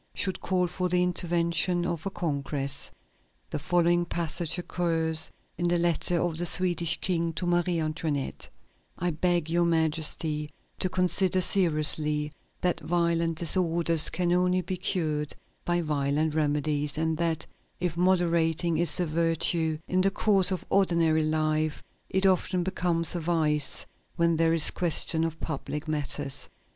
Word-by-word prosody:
should 190 -2 -1
call 185 -1 0
for 180 +1 -3
the 180 0 +2
intervention 175 0 +1
of 170 +1 -3
a - - -1
congress. 140 -5 -2 0.6
The - - -3
following 175 +2 +1
passage 170 0 -2
occurs 165 -3 -1 0.3
in 175 - 0
the 175 0 +2
letter 170 0 +2
of 165 -2 0
the 175 - -1
Swedish 175 -2 +3
King 170 -3 0
to 175 - -3
Marie 175 0 +1
Antoinette: 155 -3 -3 0.5
"I 175 0 -1
beg 170 0 0
Your 170 +1 +1
Majesty 160 -2 -1 0.3
to 185 - +1
consider 185 +1 +1
seriously 155 -4 +2 0.3
that 180 -1 0
violent 170 -1 0
disorders 170 -1 +2
can 175 -1 0
only 180 +1 +2
be 185 +1 -4
cured 155 -6 -2 0.3
by 175 0 0
violent 150 0 -1
remedies, 150 -1 -1
and 160 0 0
that 165 -2 -1 0.3
if 175 -2 -2
moderation 170 -2 +1
is 170 0 +4
a 180 - +1
virtue 165 0 0
in 185 0 +1
the 195 - +3
course 195 -1 +5
of 185 -2 -3
ordinary 170 -5 +2
life, 155 0 -1 0.3
it 190 +1 +1
often 185 -1 +1
becomes 170 -2 0
a 175 - -2
vice 155 -3 0 0.3
when 170 -1 +2
there 165 0 +2
is 165 -2 +5
question 165 -1 +1
of 165 -1 -3
public 150 0 -5
matters. 145 -2 -1
170 Hz, 145 wpm, -27 LUFS, 155-175 Hz, 0.6 s, course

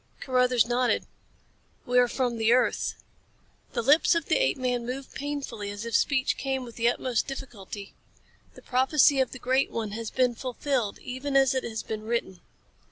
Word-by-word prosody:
Carruthers 250 -2 +3
nodded. 245 +1 +1 0.8
"We 250 0 +3
are 245 - +5
from 245 -1 -1
the 225 +1 +3
earth." 255 - +1 0.8
The 235 - -1
lips 300 +7 +5
of 335 -3 0
the - - +2
apeman 250 - 0
moved 255 +3 -6
painfully 275 -8 -4
as 205 +2 -6
if 230 -2 -2
speech 265 +1 +2
came 265 -1 -2
with 235 -2 -10
the 235 0 +1
utmost 245 -1 -1
of - - -25
difficulty. 210 -7 -8 0.6
"The - - -14
prophecy 270 +2 +4
of 260 - +1
the - - -7
Great 260 +2 +1
One 220 -3 -3
has 225 +1 -4
been 255 -2 +2
fulfilled 250 -2 -2
even 265 +3 -4
as 270 -1 +4
it 260 - -1
has 220 -1 -4
been 215 -1 -5
written." 220 -5 -3
250 Hz, 175 wpm, -27 LUFS, 230-265 Hz, 0.8 s, are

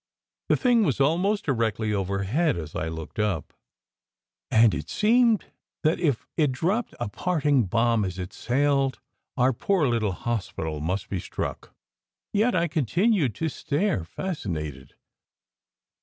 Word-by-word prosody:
The - - +4
thing 240 -3 +4
was 140 - 0
almost 180 +9 +2
directly 115 -5 0
overhead 100 - 0
as 80 -3 -7
I 80 - -2
looked 80 +4 -7
up, 100 -8 -1 1.0
and 110 -1 +5
it 80 +1 -4
seemed 230 0 +3 0.4
that 155 +1 +2
if 140 -8 0
it 150 -4 +2
dropped 185 - -1
a 120 - -2
parting 145 - +1
bomb 115 +2 +2
as 95 -1 -3
it 90 +1 -6
sailed 135 +1 +1 0.4
our 130 +1 +3
poor 180 +6 +1
little 115 -5 +1
hospital 90 -8 -3
must 90 +6 -2
be 95 - -3
struck. - - -5 0.6
Yet 215 +3 +2
I 170 -1 +2
continued 160 - +1
to 160 - -1
stare, 155 - -1
fascinated. 75 - -5
125 Hz, 135 wpm, -26 LUFS, -, 1.0 s, and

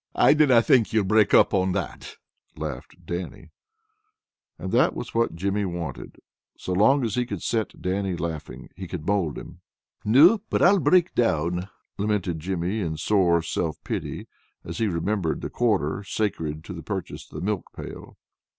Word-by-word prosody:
"I - - +6
dinna 135 -6 +5
think 120 -3 +4
ye'll 110 -2 +3
break 105 +1 +3
up - - +5
on 95 -1 +2
that," - - -5 0.4
laughed 75 -5 -7
Dannie. 85 +1 -6 1.1
And - - -5
that - - +3
was - - -6
what 115 -6 +1
Jimmy 100 +4 -1
wanted. 85 -3 -5 0.4
So 90 - -4
long 125 +9 +4
as 110 - -2
he 125 - +1
could 125 - -6
set 110 -3 -2
Dannie 95 0 -1
laughing, 80 -2 -6
he 95 +1 -7
could 85 -3 -6
mold 95 -7 0
him. - - -10 0.4
"No, 160 - +6
but - - +1
I'll 195 +3 +6
break 180 0 +3
down," 90 -4 0 0.3
lamented 100 -5 -1
Jimmy 90 +4 -2
in 80 -6 -2
sore 85 -2 +2
self 80 -1 -2
pity, - - -4 0.4
as - - -6
he 115 - +2
remembered 90 -1 -1
the - - -5
quarter 100 -7 0
sacred 80 -7 -2
to 85 - -8
the 85 - -7
purchase 95 +3 -6
of - - -14
the 80 +4 -4
milk 105 -2 -2
pail. - - -10
95 Hz, 170 wpm, -25 LUFS, 85-110 Hz, 1.1 s, I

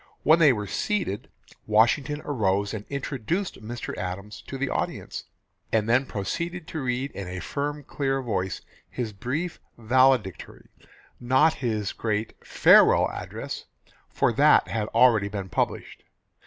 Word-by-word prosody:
When 160 +2 +5
they 155 -4 +7
were 105 -4 -2
seated 145 - -2 0.4
Washington 125 +8 +2
arose 100 -7 0
and 105 -1 -5
introduced 140 - -3
Mr. 120 +2 -6
Adams 95 +4 -6
to 135 - -5
the 140 +1 -1
audience, - - -4 0.5
and 110 -1 +1
then 125 +3 +3
proceeded 170 - -4
to 160 - -4
read 130 +2 -2
in 100 -2 -7
a 90 0 -5
firm 145 - -3
clear 135 -1 -1
voice 95 -6 -2 0.3
his 115 -4 -4
brief 140 - -3 0.2
valedictory 120 - +1 0.5
not 130 +6 +3
his 110 -6 -2
great 110 -1 -2
"Farewell - - +5
Address," - - -6 0.4
for - - +1
that - - +5
had 105 0 -2
already 115 -3 +4
been 100 -2 -5
published. - - -2
120 Hz, 135 wpm, -26 LUFS, 105-140 Hz, 0.5 s, they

